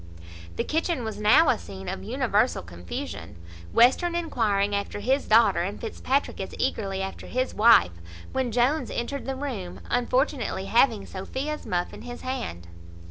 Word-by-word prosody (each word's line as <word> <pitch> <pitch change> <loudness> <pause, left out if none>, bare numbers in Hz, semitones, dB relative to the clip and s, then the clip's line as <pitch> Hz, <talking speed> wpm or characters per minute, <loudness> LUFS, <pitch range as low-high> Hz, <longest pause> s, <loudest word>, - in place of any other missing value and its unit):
The - - -1
kitchen 320 -3 -1
was 220 -2 -5
now 215 +10 +6
a - - +2
scene 95 -1 -9
of 95 - -4
universal - - +1
confusion, 85 -1 -7 0.4
Western 305 +9 +4
enquiring 205 -12 0
after 200 0 -2
his 260 +7 0
daughter, 215 -4 +5
and 195 +4 -3
Fitzpatrick 265 +4 -1
as - - -6
eagerly 195 -2 -1
after 195 - -6
his 255 +1 -1
wife, 225 - +6 0.4
when 260 -2 -1
Jones 250 +7 +1
entered 275 +4 -4
the 270 - -2
room, 250 -10 -5
unfortunately 245 -4 0
having 230 -2 +3
Sophia's 265 +10 -5
muff 175 -3 -1
in - - -10
his 245 0 -8
hand. 170 - -4
230 Hz, 150 wpm, -26 LUFS, 195-265 Hz, 0.4 s, now